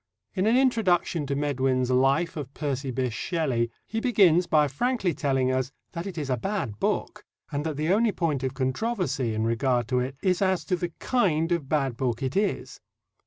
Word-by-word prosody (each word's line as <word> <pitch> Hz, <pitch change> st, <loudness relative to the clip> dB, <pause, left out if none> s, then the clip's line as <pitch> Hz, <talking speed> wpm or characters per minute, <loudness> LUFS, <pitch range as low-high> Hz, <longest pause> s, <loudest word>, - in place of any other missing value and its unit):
In 190 Hz, +3 st, +1 dB
an 230 Hz, +3 st, +4 dB
introduction 190 Hz, -, +2 dB
to 140 Hz, -, -1 dB
Medwin's 130 Hz, -3 st, 0 dB
Life 135 Hz, +7 st, +2 dB
of 140 Hz, -4 st, -5 dB
Percy 140 Hz, -3 st, -2 dB
Bysshe 130 Hz, -2 st, -1 dB
Shelley 130 Hz, -4 st, -1 dB, 0.2 s
he 225 Hz, -, -3 dB
begins 185 Hz, -8 st, +4 dB
by 150 Hz, -1 st, +4 dB
frankly 195 Hz, -, 0 dB
telling 135 Hz, -2 st, +1 dB
us 130 Hz, 0 st, -1 dB, 0.2 s
that 170 Hz, +2 st, -5 dB
it 185 Hz, -3 st, -7 dB
is 150 Hz, -3 st, -3 dB
a 125 Hz, -, +1 dB
bad 135 Hz, -, -3 dB
book, -, -, -1 dB, 0.3 s
and 145 Hz, 0 st, -2 dB
that 155 Hz, -3 st, -3 dB
the 155 Hz, +4 st, +1 dB
only 225 Hz, +1 st, +3 dB
point 160 Hz, -8 st, -1 dB
of 130 Hz, 0 st, -3 dB
controversy 135 Hz, -, -1 dB
in 110 Hz, -, 0 dB
regard 120 Hz, +1 st, +1 dB
to 125 Hz, -, +2 dB
it 130 Hz, +2 st, -3 dB
is 185 Hz, -1 st, +2 dB
as 190 Hz, -2 st, +1 dB
to 185 Hz, -, +1 dB
the 175 Hz, 0 st, -3 dB
kind 170 Hz, -10 st, +1 dB
of 160 Hz, -6 st, -1 dB
bad 135 Hz, -6 st, 0 dB
book 125 Hz, -2 st, -1 dB
it 130 Hz, 0 st, -2 dB
is. 200 Hz, +1 st, -1 dB
145 Hz, 195 wpm, -26 LUFS, 130-180 Hz, 0.3 s, an